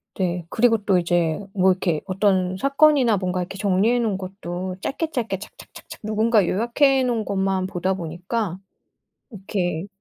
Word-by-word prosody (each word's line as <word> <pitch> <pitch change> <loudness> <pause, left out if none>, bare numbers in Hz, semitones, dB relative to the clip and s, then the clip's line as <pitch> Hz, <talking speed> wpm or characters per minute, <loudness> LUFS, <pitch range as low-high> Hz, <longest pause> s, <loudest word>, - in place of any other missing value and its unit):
네. 180 -2 -2
그리고 230 0 +3
또 195 -2 +3
이제 170 -2 +1
뭐 190 -1 +4
이렇게 175 -4 -1
어떤 185 -1 +1
사건이나 275 -2 +4
뭔가 180 -1 -2
이렇게 180 +2 -6
정리해 205 +4 +2
놓은 220 -5 0
것도 185 -1 -6
짧게 315 +7 -3
짧게 230 -8 -2
착착착착 - - -12
누군가 215 -1 +2
요약해 260 +7 +2
놓은 240 -3 0
것만 190 -1 0
보다 185 +1 -1
보니까 180 +3 -3 0.7
이렇게 190 -5 -3
195 Hz, 330 characters per minute, -23 LUFS, 180-225 Hz, 0.7 s, 뭐